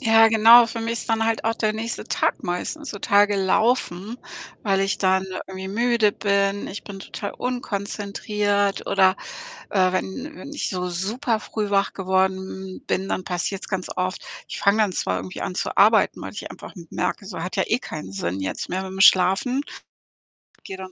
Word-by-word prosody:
Ja, 225 -2 +6
genau, 230 +2 +8
für 230 0 -5
mich 230 +1 -2
ist - - -9
dann 225 0 +2
halt 225 -1 0
auch 225 0 +1
der 215 -1 0
nächste 225 +2 -4
Tag - - 0
meistens 220 - -4
total 205 0 +3
gelaufen, 205 +1 0 0.4
weil 195 -2 +2
ich 195 - 0
dann 190 0 +2 0.2
irgendwie 190 0 -7
müde 230 0 +2
bin, 200 -1 0
ich 200 - -7
bin 195 -1 -8
total 200 +1 -6
unkonzentriert. 205 -3 -2
Oder, 190 0 +4 0.5
äh, 185 -2 +3
wenn 255 - -4
wenn 285 - -9
ich - - -2
so 180 -1 -2
super 215 +6 -1
früh 210 -2 -3
wach 200 0 +2
geworden 190 0 -1
bin, 190 +1 -1
dann 185 - -2
passiert's 185 +2 -3
ganz 190 -2 -3
oft, 185 +1 -2 0.2
ich - - -6
fange 200 +2 +3
dann 210 -4 +2
zwar 95 - -1
irgendwie 95 0 -6
an 180 - -3
zu - - -2
arbeiten, 215 +1 +4
weil - - -6
ich - - -7
einfach - - -11
m 170 -2 -11
merke, 200 - -2
so: 185 -4 -7
„Hat 180 - -5
ja - - +3
eh 225 - +2
keinen 150 - -7
Sinn 95 0 -3
jetzt 95 - -4
mehr 185 +1 -2
mit'm 190 0 -4
Schlafen.“, 195 +9 +5 1.0
gehe 190 - -7
dann 190 0 -8
200 Hz, 185 wpm, -23 LUFS, 190-225 Hz, 1.0 s, genau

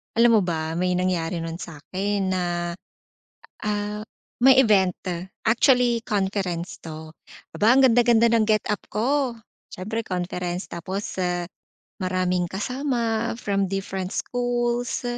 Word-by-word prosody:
Alam 230 -1 +6
mo - - +1
ba, 160 -1 -2
may 180 0 +1
nangyari 180 -2 0
nun 165 +1 -5
sa'kin, 190 +5 -3
na, 185 -1 0 1.2
ah, 210 0 -2 0.4
may 265 +2 +7
event, 195 -7 +4 0.5
actually 245 0 +3
conference 190 -4 -2
'to. 160 -1 -8 0.5
Aba 220 +3 +5
ang 270 - +5
ganda 245 -1 +5
ganda 235 -1 +5
ng 230 -1 +3
get 215 -1 +3
up 210 - -1
ko, 260 +4 +1 0.4
siyempre 220 +5 -4
conference 180 0 -3
tapos, 185 +4 -5
ah, 175 -1 -1 0.5
maraming 185 -1 0
kasama 235 +1 -1
from 200 -4 0
different 190 -1 -3
schools, 245 0 -1
200 Hz, 125 wpm, -24 LUFS, 180-230 Hz, 1.2 s, may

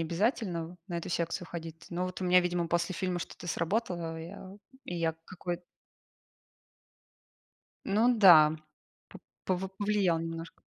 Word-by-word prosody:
обязательно 175 - 0
в 180 - -12
на 170 -2 -2
эту - - -6
секцию 170 +1 -2
ходить. 165 -1 -8
Но 180 +1 -1
вот 185 +1 -5
у - - -1
меня, 180 0 +6
видимо, 175 -1 0
после 170 +1 0
фильма 180 -1 -1
что-то 175 - -8
сработало 170 -1 -1
и - - -6
я 185 +2 -10 0.3
и 175 - -5
я 165 -1 0
какой 175 -1 -5 2.3
Ну 215 - +4 0.2
да, 160 -6 +8 0.5
по - - -12 0.3
пов 185 0 -1
повлиял 200 -5 +2
немножко. 165 0 -6
175 Hz, 145 wpm, -30 LUFS, 165-185 Hz, 2.3 s, да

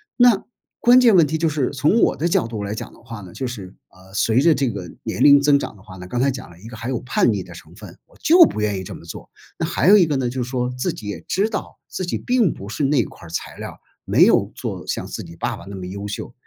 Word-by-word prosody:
那 245 -5 +4 0.3
关 245 +2 +6
键 235 -5 +6
问 170 -3 +6
题 160 +2 -2
就 165 0 +2
是 145 -4 -1
从 145 - +2
我 - - +3
的 170 - -1
角 170 - +1
度 110 -3 -5
来 100 +1 -4
讲 - - -7
的 - - -18
话 115 -2 -9
呢 90 -2 -12
就 130 +5 -4
是， 100 -7 -8 0.2
呃， 95 +1 -19
随 110 +4 +2
着 165 +2 +5
这 135 -2 0
个 100 -5 -6
年 - - -2
龄 140 -1 +7
增 140 0 +4
长 140 - -5
的 100 - -18
话 95 -1 -12
呢， 90 0 -9
刚 120 +6 -2
才 140 - +3
讲 130 -7 -6
了 85 - -17
一 105 - -12
个 115 -1 -9
还 115 +2 -5
有 125 -3 -1
叛 120 -2 +1
逆 100 - -2
的 90 - -11
成 85 -1 -14
分。 100 -4 -12
我 - - -25
就 340 +2 +8
不 110 - -3
愿 105 -2 0
意 95 - -5
这 - - -8
么 - - -11
做， 85 - -9 0.3
那 - - -1
还 160 - +1
有 210 - +9
一 185 - +5
个 150 -3 -1
呢， 125 -2 -1
就 125 0 -3
是 - - -7
说 125 -1 -1
自 125 - -1
己 105 - -9
也 105 - -4
知 205 +3 +1
道 210 - -6
自 185 - -4
己 175 - -3
并 245 -9 +1
不 100 - -10
是 110 +7 -3
那 135 -3 +3
块 - - -13
儿 - - -11
材 85 - -5
料， - - -8 0.3
没 - - +5
有 - - +3
做 - - -5
像 - - -3
自 - - -6
己 85 - -12
爸 - - -3
爸 - - -12
那 100 0 -8
么 90 -1 -7
优 100 +2 -6
秀， 100 - -6
125 Hz, 320 characters per minute, -21 LUFS, 100-155 Hz, 0.3 s, 有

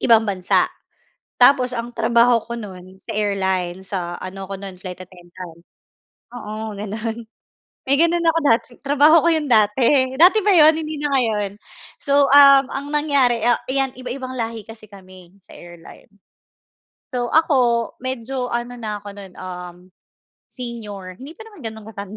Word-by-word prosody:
ibang 225 -2 +4
bansa. 185 -2 +1 0.8
Tapos 255 -1 +5
ang 235 0 -4
trabaho 235 +1 +3
ko 235 - -7
no'n 190 -3 -11
sa - - -9
airline, 190 -3 -1
sa 175 -3 -4
ano 190 +1 -7
ko 195 - -5
no'n 195 -1 -9
Flight 185 -1 -9
attendant, 175 -2 -13 0.7
oo 215 -1 -6
gano'n. 220 +2 -5 0.7
May 275 +1 +3
gano'n 335 +1 +2
ako 330 0 +3
dati, 230 0 +2 0.2
trabaho 295 +4 +4
ko - - +5
'yon 310 -2 -1
dati. 245 +5 +3
Dati 365 +6 +7
pa 415 - +4
'yon, 315 -1 +6
hindi 310 -1 -5
na 290 -1 -2
ngayon. 215 -5 -1 0.5
So, 280 0 +3
uhm, 275 -1 +7
ang 275 +1 -5
nangyari, 275 -6 +1
a 240 0 +3
'yan 270 -1 -1
iba-ibang 255 +1 -6
lahi 225 -1 -4
kasi 225 -1 -12
kami 185 -2 -16
sa - - -17
airline. 175 -1 -14 1.1
So 245 -1 -1
ako, 250 -7 +2
medyo 255 0 -4
ano 240 +1 -3
na 215 -3 -5
ako 205 - -10
nun, 195 -2 -11
uhm, 180 -1 -8 0.7
senior. 210 -7 -8
Hindi 285 +4 -10
pa 445 - -11
naman 410 -5 -16
ganun 220 -1 -7
katanda, 200 -1 -9
230 Hz, 155 wpm, -20 LUFS, 195-270 Hz, 1.1 s, Dati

